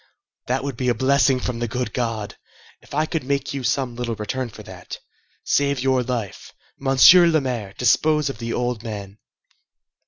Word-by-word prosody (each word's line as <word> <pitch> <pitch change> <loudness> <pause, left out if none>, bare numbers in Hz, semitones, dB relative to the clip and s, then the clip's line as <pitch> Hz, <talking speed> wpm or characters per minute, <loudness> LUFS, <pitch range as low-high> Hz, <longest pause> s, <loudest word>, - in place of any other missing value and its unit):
that 130 +1 -1
would 140 -3 -4
be 125 +1 -1
a 120 - +2
blessing 135 +1 +3
from 125 -2 -3
the 120 - -1
good 125 +2 -3
God, 115 -4 -3 0.5
if - - -21
I 155 +1 +2
could 160 -2 -3
make 140 +2 -2
you 135 -2 -4
some 130 0 -1
little 120 -1 -3
return 120 +4 -4
for - - -12
that! - - -9 0.5
Save 140 -1 +1
your 130 0 +2
life! 120 -5 -5 0.3
Monsieur 135 +6 +7
le 160 -2 +3
Maire, 120 -8 -4
dispose 150 +5 +2
of 135 - -5
the 115 -1 -4
old 120 -2 -2
man!" 105 -3 -7
125 Hz, 180 wpm, -22 LUFS, 115-140 Hz, 0.5 s, Monsieur